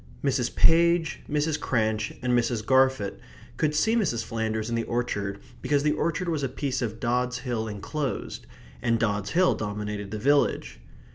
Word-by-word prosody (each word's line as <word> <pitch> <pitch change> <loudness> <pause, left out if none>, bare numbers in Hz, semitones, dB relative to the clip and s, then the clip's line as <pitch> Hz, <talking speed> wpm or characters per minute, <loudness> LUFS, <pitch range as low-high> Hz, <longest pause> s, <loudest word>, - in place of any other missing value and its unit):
Mrs. 130 -3 0
Page, 170 0 +4
Mrs. 150 +1 0
Cranch, 110 -3 0
and 125 -1 +1
Mrs. 115 -2 +1
Garfit 130 -5 +2 0.4
could 150 -1 +1
see 220 +9 +3
Mrs. 120 - 0
Flanders 110 -1 -2
in 120 - -3
the 115 - +1
orchard 100 -5 -2 0.2
because 145 -1 +1
the 150 - +3
orchard 170 +4 -1
was 160 -3 0
a 135 - -1
piece 135 0 -2
of 110 -2 -3
Dods 125 +1 0
Hill 120 -4 -3
enclosed; 130 +7 -4 0.3
and 115 -1 +1
Dods 105 -2 -1
Hill 180 +1 +4
dominated 105 -1 -4
the 110 - -4
village. 130 - +1
125 Hz, 160 wpm, -26 LUFS, 110-145 Hz, 0.4 s, Page